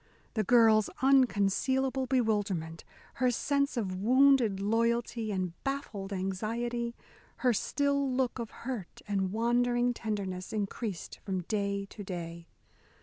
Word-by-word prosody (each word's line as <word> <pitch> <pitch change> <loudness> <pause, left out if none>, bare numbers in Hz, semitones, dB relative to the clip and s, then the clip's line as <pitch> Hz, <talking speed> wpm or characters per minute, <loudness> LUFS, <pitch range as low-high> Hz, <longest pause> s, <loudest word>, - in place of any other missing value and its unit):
The 220 - +1
girl's 220 -3 +5
unconcealable 260 +2 +3
bewilderment, 205 -10 0 0.4
her 255 - +5
sense 280 +3 0
of 195 -5 -1
wounded 250 -1 +4
loyalty 230 +1 0
and 185 -3 -2
baffled 250 -8 -4
anxiety, 230 +5 -2 0.5
her 250 - +5
still 280 +4 0
look 255 -1 0
of 230 -2 -4
hurt 235 -8 -7
and 195 -2 0
wondering 240 +2 +2
tenderness, 200 -5 -4
increased 205 -2 -4
from 190 -3 -2
day 200 +1 -1
to 205 +1 -9
day. 170 -2 -6
225 Hz, 115 wpm, -30 LUFS, 195-245 Hz, 0.5 s, girl's